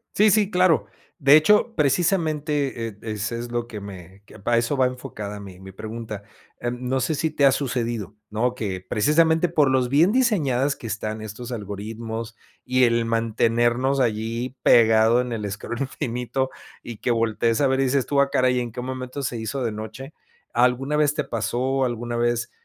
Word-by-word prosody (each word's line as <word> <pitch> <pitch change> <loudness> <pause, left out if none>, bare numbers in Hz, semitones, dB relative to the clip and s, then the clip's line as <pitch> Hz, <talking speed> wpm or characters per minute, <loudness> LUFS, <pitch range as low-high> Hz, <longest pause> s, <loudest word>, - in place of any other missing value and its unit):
Sí, 210 0 +5
sí, 205 -1 +3
claro, 180 -3 +3 0.3
de 140 +1 +7
hecho, 210 +8 +4
precisamente, 150 -5 0
eh, 105 -2 -9
es 105 -1 -3
es 120 +1 -5
lo 120 0 -2
que 110 -3 -7
me 95 0 -11
que - - -15
para 115 +4 +1
eso 115 +5 +1
va 130 -1 +4
enfocada 105 -5 -7
mi 95 -2 -11
mi 95 0 -11
pregunta, 110 0 -7 0.4
em, 125 +1 -4
no 130 0 +1
sé 140 +6 0
si 160 +2 0
te 145 -2 +2
ha 135 - +7
sucedido, 120 -7 -2 0.2
¿no? 120 +4 0
Que 95 -5 -4
precisamente 160 - +2
por 145 -5 +2
los 130 -2 +2
bien 160 +8 +4
diseñadas 145 - +2
que 115 - -9
están 110 0 -4
estos 110 +3 -7
algoritmos 110 +2 -6 0.3
y 130 0 +2
el 115 0 +2
mantenernos 120 +3 +1
allí 115 +2 -1
pegado 115 +1 +5
en 125 -1 -4
el 105 -2 -3
scroll 120 +5 -5
infinito, 130 0 -2 0.3
y 115 -3 -8
que 120 - -1
voltees 115 +2 +1
a 140 - +4
ver, 135 0 +1
y - - +3
dices 135 -1 +1
tú: 140 -1 +1
"Ah 140 0 +3
caray, 125 0 +2
¿y - - +2
en 120 -2 -5
qué 125 +2 -6
momento 130 +2 -5
se 120 -3 -3
hizo 120 +4 -3
de 115 - -1
noche?". 110 +7 -8 0.4
¿Alguna 125 +4 +2
vez 150 -1 +3
te 150 - -1
pasó? 130 +4 -1
¿Alguna 120 0 -3
vez, 120 0 0
120 Hz, 190 wpm, -23 LUFS, 110-135 Hz, 0.4 s, de